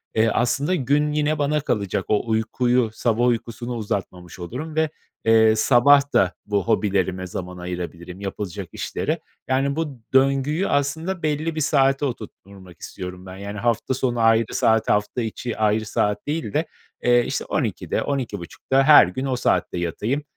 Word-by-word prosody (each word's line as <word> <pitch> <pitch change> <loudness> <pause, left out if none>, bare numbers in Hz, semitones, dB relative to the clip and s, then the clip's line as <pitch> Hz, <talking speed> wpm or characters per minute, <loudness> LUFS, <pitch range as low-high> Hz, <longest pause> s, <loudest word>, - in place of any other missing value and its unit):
eee, 110 +1 +3
aslında 140 - +1
gün 145 0 +1
yine 150 +1 +1
bana 150 +1 +1
kalacak, 100 -8 -1
o 110 +2 0
uykuyu, 120 +2 +1
sabah 115 +1 +1
uykusunu 120 0 -2
uzatmamış 95 -5 -5
olurum 130 - -6
ve, 160 0 +2 0.4
eee, 110 -1 +5
sabah 140 +5 +4
da 95 -1 +3
bu 100 -2 0
hobilerime 95 -4 0
zaman 90 0 -6
ayırabilirim, 90 0 -6
yapılacak 100 -2 -5
işlere. - - -3 0.3
Yani, 135 +2 +1
bu 150 -6 -4
döngüyü 135 +6 +2
aslında 160 +6 -1
belli 155 +1 -1
bir 155 - -2
saate 135 -1 +2
oturtturmak 100 - -9
istiyorum 90 0 -8
ben. 95 0 -9
Yani, 100 +1 -6
hafta 120 +3 0
sonu 125 -2 -1
ayrı 115 0 +3
saat, 110 0 +2
hafta 105 +4 +1
içi 115 +1 -4
ayrı 110 0 +1
saat 105 +1 -1
değil 155 +2 -3
de, 155 +3 +1 0.4
eee, 120 0 +4
işte, - - -3
12.00'de, - - -2
12.30'ta 130 0 -1
her 145 - +8
gün 130 +9 -4
o 130 -2 0
saatte 125 - 0
yatayım, 105 - -2
120 Hz, 155 wpm, -22 LUFS, 100-140 Hz, 0.4 s, her